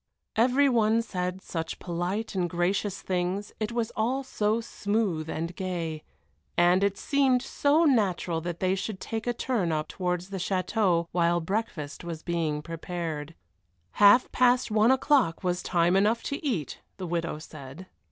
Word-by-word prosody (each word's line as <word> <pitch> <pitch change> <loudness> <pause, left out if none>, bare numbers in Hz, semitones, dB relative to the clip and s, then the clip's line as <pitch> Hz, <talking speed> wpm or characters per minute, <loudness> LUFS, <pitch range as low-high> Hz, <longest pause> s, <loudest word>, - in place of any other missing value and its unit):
Every 255 +5 +4
one 230 -2 +3
said 180 -3 -4
such 165 -1 -4
polite 180 +5 -3
and 180 -3 0
gracious 185 +3 -1
things, 185 +2 -2
it 215 +1 -2
was 235 -1 -1
all 250 +5 0
so 215 -3 0
smooth 205 -8 -1
and 165 +2 -3
gay, 170 -4 -3 0.6
and 175 +2 +4
it 200 -1 +1
seemed 270 -3 +2
so 300 +4 +2
natural 190 - +1
that 175 0 -5
they 185 0 +2
should 195 +1 -3
take 225 +3 -4
a 240 - +2
turn 225 -10 0
up 155 -1 -1
towards 180 0 -3
the 195 - -3
château 185 -1 +1
while 175 0 +2
breakfast 170 -6 -3
was 165 -2 -6
being 160 -4 -1
prepared. 165 -2 -5 0.6
Half 205 +4 +6
past 250 -2 +3
one 215 +2 +4
o'clock 260 - +3
was 180 0 0
time 175 +1 +2
enough 215 +4 +2
to 280 - -4
eat, 215 - -2 0.2
the 190 - -5
widow 170 -2 -2
said. 155 +2 -10
185 Hz, 155 wpm, -27 LUFS, 170-225 Hz, 0.6 s, Half